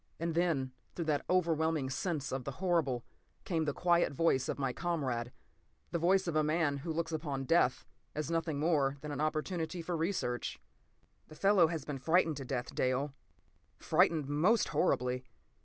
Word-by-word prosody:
p> - - -6
And 170 - -1
then, 160 -6 +1 0.2
through 170 - -3
that 150 -2 +1
overwhelming 160 -5 +2
sense 150 -1 -2
of 130 -1 -2
the 140 - -5
horrible, 160 -8 0 0.4
came 165 -3 0
the 145 - +1
quiet 175 +1 +2
voice 135 -3 +2
of - - -2
my 135 -3 -1
comrade—the 135 0 -4
voice 190 +3 +3
of 170 -3 -2
a 155 - +3
man 155 -2 +1
who 160 +4 -4
looks 165 +1 -2
upon 145 -4 -3
death 135 -3 +2 0.3
as 150 +2 -2
nothing 165 -3 -1
more 145 -3 +2
than 150 - -5
an 145 - -3
opportunity 160 +3 -1
for 170 +1 -3
research. 160 - -2 0.7
"The 155 - -13
fellow 195 0 +5
has 160 -3 -4
been 145 -3 -4
frightened 165 0 +2
to 135 - -6
death, 125 -1 -3
Dale. 130 +2 0 0.6
Frightened 160 -3 +2
most 170 +11 +3
horribly. 125 -7 +1
155 Hz, 170 wpm, -33 LUFS, 140-170 Hz, 0.7 s, fellow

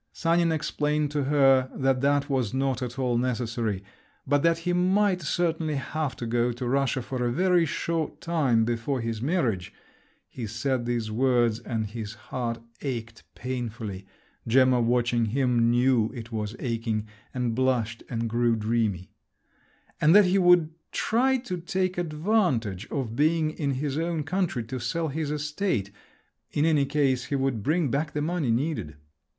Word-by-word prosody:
Sanin 170 0 +2
explained 150 -1 0
to 145 -2 -1
her 135 -2 +4
that 135 -1 +1
that 140 0 +2
was 130 -5 -1
not 135 -2 0
at 125 0 -4
all 125 -3 +1
necessary… 115 -5 -2 0.4
but 145 +1 +2
that 165 +1 +3
he 175 +1 -2
might 185 +1 +2
certainly 160 -1 0
have 140 0 -3
to 120 - -5
go 120 +1 +1
to 120 +1 -5
Russia 135 0 +1
for 125 0 -3
a 120 - +1
very 180 +3 +3
short 165 +1 -2
time 135 -10 +2
before 120 +3 -1
his 115 -2 -3
marriage—(he 120 - -4
said 120 +3 -2
these 115 -3 -1
words, 120 -1 +2
and 110 -3 -3
his 110 -1 -6
heart 120 0 -4 0.2
ached 115 -5 -5
painfully, 115 -6 -5 0.4
Gemma 130 +1 +4
watching 120 0 +2
him, 120 0 +2
knew 120 -2 +3
it 115 -1 -8
was 105 0 -3
aching, 115 -3 -2 0.3
and 125 -2 -1
blushed 120 -2 0
and 115 -1 -2
grew 120 +1 +2
dreamy)—and 110 - -2
that 205 -1 +8
he 185 +2 +3
would 175 -3 +5 0.2
try 260 +4 +2
to 235 -8 -5
take 185 0 -1
advantage 150 - 0
of 125 -6 -3
being 155 +2 +2
in 145 -3 -2
his 140 +2 -2
own 165 -2 -1
country 160 -5 -1
to 125 +3 -5
sell 160 +7 -2
his 150 +1 -3
estate… 150 - -1 0.6
in 150 - +1
any 150 -4 +3
case 135 -3 +1
he 140 - -2
would 135 -5 0
bring 155 - +1
back 150 +2 -1
the 150 - -1
money 165 -4 -1
needed. 120 - -1
130 Hz, 155 wpm, -26 LUFS, 115-155 Hz, 0.6 s, that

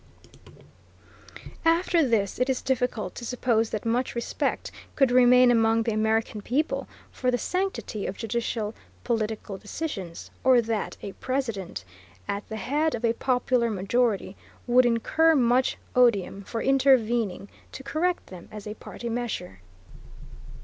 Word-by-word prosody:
After 335 +1 +3
this 225 -7 0
it 250 +1 +1
is 260 - -1
difficult 250 -4 -1
to - - -9
suppose 235 -2 +1
that 215 - -4
much 245 +3 0
respect 235 - -2 0.2
could 270 -3 +3
remain 250 0 +6
among 225 -1 +3
the 230 - -1
American 220 0 0
people 275 +9 -1 0.2
for 255 - -1
the 245 - +2
sanctity 365 - -2
of 190 - -5
judicial 225 -1 -2 0.3
political 215 -4 -2
decisions, 205 - -6
or 260 -2 +6
that 225 -2 -2
a 200 - -5
President, 225 - -4 0.4
at 200 0 -4
the 220 - -4
head 295 +9 0
of 235 0 -2
a 230 - +3
popular 250 -1 +1
majority, 205 0 0 0.3
would 245 0 +5
incur 315 +8 +3
much 250 -1 +2 0.2
odium 210 -6 +3
for 225 +1 -4
intervening 240 -7 +2 0.2
to 265 - -9
correct 335 +6 -1
them, 180 -2 -12
as 210 -1 -8
a 210 - -5
party 235 +2 -8
measure. 230 - -4
235 Hz, 135 wpm, -26 LUFS, 215-255 Hz, 0.4 s, remain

